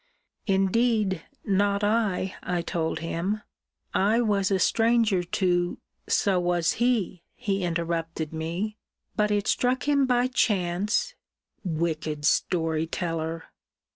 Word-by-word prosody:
Indeed, 195 Hz, 0 st, +2 dB, 0.2 s
not 200 Hz, 0 st, +2 dB
I, 205 Hz, -3 st, +1 dB
I 175 Hz, -1 st, -2 dB
told 165 Hz, -2 st, -2 dB
him: 180 Hz, +6 st, -2 dB, 0.5 s
I 210 Hz, +4 st, +3 dB
was 205 Hz, -5 st, +2 dB
a 195 Hz, -, +2 dB
stranger 225 Hz, -1 st, +3 dB
to 175 Hz, 0 st, 0 dB, 0.3 s
So 195 Hz, -3 st, +3 dB
was 175 Hz, -1 st, +1 dB
he, 225 Hz, -8 st, +1 dB
he 195 Hz, -2 st, -1 dB
interrupted 165 Hz, -2 st, -2 dB
me; 170 Hz, +7 st, -3 dB, 0.4 s
but 210 Hz, 0 st, +2 dB
it 205 Hz, 0 st, +1 dB
struck 250 Hz, +2 st, +1 dB
him 280 Hz, -2 st, +3 dB
by 245 Hz, -1 st, +3 dB
chance 210 Hz, -, +1 dB, 0.5 s
Wicked 155 Hz, -3 st, -2 dB
story 160 Hz, -1 st, +1 dB
teller! 165 Hz, -1 st, -3 dB
190 Hz, 110 wpm, -26 LUFS, 170-215 Hz, 0.5 s, I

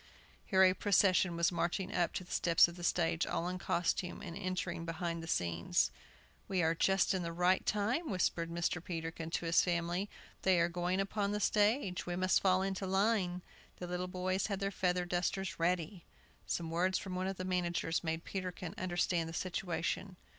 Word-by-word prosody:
Here 190 Hz, -2 st, +5 dB
a 185 Hz, -1 st, +6 dB
procession 185 Hz, -3 st, +3 dB
was 170 Hz, +2 st, +2 dB
marching 180 Hz, +3 st, -1 dB
up 175 Hz, -1 st, 0 dB
the 185 Hz, -, -3 dB
steps 170 Hz, -1 st, +4 dB
of 170 Hz, -, -9 dB
the 175 Hz, -, -9 dB
stage, 80 Hz, -, +1 dB
all 170 Hz, -, -1 dB
in 180 Hz, 0 st, -3 dB
costume, 175 Hz, +1 st, -1 dB
and 170 Hz, -4 st, -6 dB
entering 185 Hz, -3 st, -3 dB
behind 170 Hz, 0 st, -3 dB
the 165 Hz, -, -8 dB
scenes. 85 Hz, -, +1 dB, 0.6 s
"We 185 Hz, -3 st, +1 dB
are 160 Hz, +1 st, +3 dB
just 190 Hz, +3 st, +2 dB
in 190 Hz, -, -1 dB
the 170 Hz, -1 st, -3 dB
right 180 Hz, +2 st, +2 dB
time," 235 Hz, +11 st, 0 dB
whispered 170 Hz, -3 st, 0 dB
Mr. 170 Hz, 0 st, -1 dB
Peterkin 165 Hz, -3 st, -5 dB
to 170 Hz, -, -2 dB
his 165 Hz, 0 st, +5 dB
family; 175 Hz, +3 st, -1 dB, 0.3 s
"they 185 Hz, -2 st, +4 dB
are 170 Hz, +1 st, +3 dB
going 175 Hz, +2 st, -1 dB
upon 200 Hz, +1 st, -1 dB
the 210 Hz, -, -1 dB
stage; 205 Hz, -3 st, +1 dB
we 175 Hz, -, -2 dB
must 185 Hz, +1 st, +2 dB
fall 185 Hz, -1 st, +3 dB
into 195 Hz, 0 st, -2 dB
line." 190 Hz, -2 st, +1 dB, 0.3 s
The 180 Hz, -, -6 dB
little 180 Hz, +1 st, -3 dB
boys 185 Hz, +1 st, -1 dB
had 200 Hz, -2 st, -2 dB
their 195 Hz, 0 st, -1 dB
feather 180 Hz, -1 st, 0 dB
dusters 180 Hz, +1 st, -2 dB
ready. 175 Hz, +1 st, 0 dB, 0.4 s
Some 165 Hz, -1 st, -2 dB
words 180 Hz, +3 st, +1 dB
from 190 Hz, -2 st, -6 dB
one 185 Hz, +1 st, -1 dB
of 195 Hz, -1 st, -3 dB
the 185 Hz, -, -4 dB
managers 175 Hz, -2 st, -1 dB
made 160 Hz, 0 st, -2 dB
Peterkin 180 Hz, -3 st, -5 dB
understand 175 Hz, -2 st, 0 dB
the -, -, -7 dB
situation. 185 Hz, +1 st, -2 dB
180 Hz, 185 wpm, -34 LUFS, 170-190 Hz, 0.6 s, a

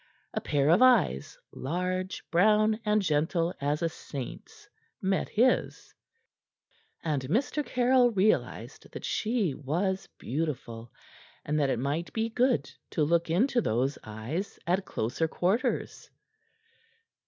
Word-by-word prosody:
A -, -, -2 dB
pair 145 Hz, 0 st, +1 dB
of 175 Hz, -, +5 dB
eyes, 240 Hz, -, +3 dB, 0.2 s
large, 180 Hz, +5 st, -3 dB
brown, 215 Hz, +4 st, +4 dB
and 210 Hz, -1 st, +2 dB
gentle 165 Hz, +2 st, +1 dB
as 145 Hz, +3 st, 0 dB
a -, -, +3 dB
saint's, 140 Hz, -5 st, -8 dB, 0.3 s
met 190 Hz, 0 st, 0 dB
his, 245 Hz, +4 st, +1 dB, 1.1 s
and 150 Hz, -4 st, 0 dB
Mr. 250 Hz, -, 0 dB
Caryll 250 Hz, -1 st, +3 dB
realized 210 Hz, -1 st, 0 dB
that -, -, -6 dB
she 215 Hz, -, 0 dB
was 180 Hz, +8 st, -2 dB
beautiful 120 Hz, -5 st, -4 dB, 0.5 s
and 150 Hz, +1 st, 0 dB
that 140 Hz, -2 st, +2 dB
it -, -, +1 dB
might 145 Hz, +7 st, -2 dB
be 225 Hz, 0 st, 0 dB
good 245 Hz, +2 st, +1 dB, 0.2 s
to 155 Hz, -, 0 dB
look 170 Hz, +2 st, +1 dB
into 240 Hz, +9 st, +2 dB
those 130 Hz, -, 0 dB
eyes 115 Hz, -, -5 dB
at 185 Hz, +3 st, +1 dB
closer 125 Hz, +9 st, -1 dB
quarters. 185 Hz, +8 st, -1 dB
175 Hz, 120 wpm, -29 LUFS, 145-215 Hz, 1.1 s, of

